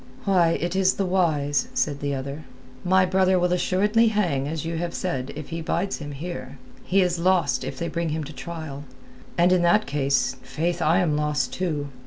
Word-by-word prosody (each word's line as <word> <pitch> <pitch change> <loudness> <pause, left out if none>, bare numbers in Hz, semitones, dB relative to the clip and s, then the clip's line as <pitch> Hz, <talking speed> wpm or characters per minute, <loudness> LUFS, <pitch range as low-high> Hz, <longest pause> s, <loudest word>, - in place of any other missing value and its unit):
"Why, 180 -4 +4
it 175 +2 -2
is 190 0 +3
this 195 - 0
wise," 150 -6 +1
said 145 -2 0
the 140 0 -2
other. 140 +3 -6 0.4
"My 185 +1 +4
brother 185 0 +3
will 180 0 +2
assuredly 210 +6 +2
hang 175 -11 0
as 160 0 -4
you 165 0 -3
have 170 0 -3
said 135 -7 -3
if 150 -1 -7
he 165 0 -4
bides 175 +4 -1
him 145 -1 -6
here. 135 -3 -6 0.3
He 190 +1 +3
is 175 -1 0
lost 170 -8 +2
if - - -5
they 170 - -2
bring 170 -1 -2
him 155 +1 -2
to 150 +2 -8
trial. 145 0 -7 0.5
And 175 +1 +4
in 185 -1 +4
that 175 +5 +4
case, 135 -2 0
faith, 165 +7 -2
I 165 +4 +3
am 160 -4 +1
lost 150 0 0
too. 155 -6 -2
165 Hz, 200 wpm, -24 LUFS, 145-180 Hz, 0.5 s, Why